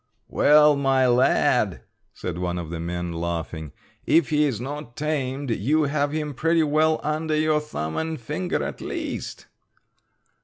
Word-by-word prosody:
"Well, 150 0 +5
my 135 -2 +2
lad," 125 +1 +2 0.3
said 85 -1 -5
one 90 -1 -2
of 85 -2 -5
the 85 - -4
men, 85 +1 -4
laughing, 85 -2 -4 0.3
"if 165 -3 +3
he 150 0 +3
is 130 -7 -1
not 135 -1 -7
tamed 140 -3 -2
you 145 +9 +1
have 145 0 0
him 150 -1 -3
pretty 165 +4 +2
well 155 +1 +2
under 155 +1 -1
your 155 0 +2
thumb 80 - -5
and 160 -1 -2
finger 155 +9 -2
at - - -5
least." - - -5
145 Hz, 150 wpm, -24 LUFS, 90-155 Hz, 0.3 s, Well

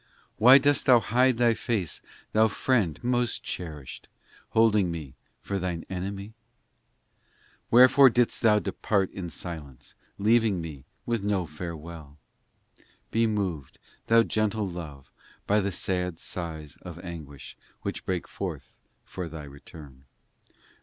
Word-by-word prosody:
Why 125 +5 +9
dost 145 0 +2
Thou 125 -2 +8
hide 125 +4 +2
Thy 120 -1 +4
face, 110 -7 -2 0.3
Thou 110 +1 +5
Friend 105 - +1
most 120 -1 0
cherished, 75 -7 -7 0.4
Holding 105 -4 +3
me 80 -6 -6 0.3
for 100 -1 -2
Thine 90 -2 -3
enemy? 100 +2 -4
VII - - -20 1.4
Wherefore 130 +3 +8
didst 120 0 +1
Thou 110 -2 +5
depart 100 -1 0
in 90 -3 -6
silence, 75 -5 -8 0.2
leaving 110 -2 +3
me 75 -5 -7 0.2
With 115 -3 -1
no 100 -3 0
farewell? 80 -2 -8 0.9
Be 115 0 +2
moved, 95 -10 -3 0.3
Thou 115 0 +6
gentle 110 -1 0
Love, 75 -7 -8 0.3
by 105 +1 +3
the 100 0 -1
sad 90 -1 -1
sighs 80 -4 -6
Of 90 -2 -9
anguish, 80 -6 -9 0.3
which - - -4
break 90 -2 -2
forth - - -6 0.3
for 90 -3 -6
Thy 80 -1 -8
return. 70 -1 -13
95 Hz, 125 wpm, -27 LUFS, 80-110 Hz, 1.4 s, Why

